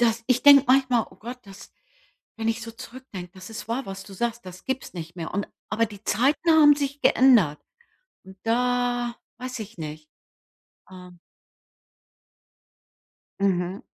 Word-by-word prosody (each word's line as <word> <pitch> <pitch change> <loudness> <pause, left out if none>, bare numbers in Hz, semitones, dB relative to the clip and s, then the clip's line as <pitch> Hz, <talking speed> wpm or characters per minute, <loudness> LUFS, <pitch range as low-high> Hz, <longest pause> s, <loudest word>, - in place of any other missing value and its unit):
das 230 -1 +2
ich 255 -1 +2
denke 285 -1 +9
manchmal: 255 -3 +3
„Oh - - -18
Gott, 245 +3 -8
das“ 195 -1 -13 0.6
wenn 225 0 -2
ich 225 +1 -1
so 230 - -7
zurückdenke, 235 -7 -10
das 185 +3 -11
ist 220 0 -8
wahr, 250 +4 -2
was 195 0 -7
du 200 - -13
sagst, 235 -1 -3
das 185 0 -11
gibt's 265 -5 -4
nicht 170 0 -8
mehr. 165 -2 -5
Und 205 - -2 0.2
aber 230 +1 +2
die 205 -1 -13
Zeiten 280 +8 +2
haben 295 -2 +7
sich 280 0 -3
geändert 225 - +5 0.6
und 190 0 -14
da 245 0 0 0.2
weiß 255 -1 -6
ich 210 -3 -9
nicht, 155 0 -8 0.8
ähm 180 -1 -13 2.2
Mhm. 185 0 0
230 Hz, 150 wpm, -25 LUFS, 190-255 Hz, 2.2 s, denke